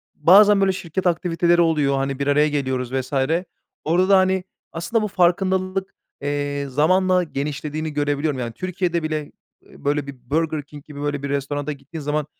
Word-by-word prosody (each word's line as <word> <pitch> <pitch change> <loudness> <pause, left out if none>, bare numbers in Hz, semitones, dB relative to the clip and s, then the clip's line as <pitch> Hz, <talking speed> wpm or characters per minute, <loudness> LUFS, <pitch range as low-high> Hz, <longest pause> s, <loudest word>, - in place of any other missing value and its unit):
bazen, 200 +6 +6
böyle, 195 -1 +3
şirket 185 0 -3
aktiviteleri 175 0 +2
oluyor, 150 -4 +2
hani, 135 0 -2
bir 140 - -1
araya 150 +1 +4
geliyoruz 130 -3 -2
vs. 130 +1 -3 0.7
Orada 180 +4 +2
da, 195 - +7
hani, 190 0 +2 0.3
aslında 190 +7 -1
bu - - 0
farkındalık 185 +1 0 0.3
eee, 145 0 -2
zamanla 185 +6 +3
genişlediğini 150 +1 -4
görebiliyorum. 145 -1 -1
Yani, 115 -2 -4
Türkiye'de 180 -1 -2
bile, 155 -2 -3 0.3
eee, - - -18
böyle 145 0 0
bir 125 -3 -11
Burger 155 0 0
King 145 0 -13
gibi 145 -1 -9
böyle 145 -1 -2
bir 140 - -3
restorana 140 +1 -2
gittiğin 150 +3 -8
zaman 150 +1 -1
150 Hz, 165 wpm, -22 LUFS, 145-180 Hz, 0.7 s, da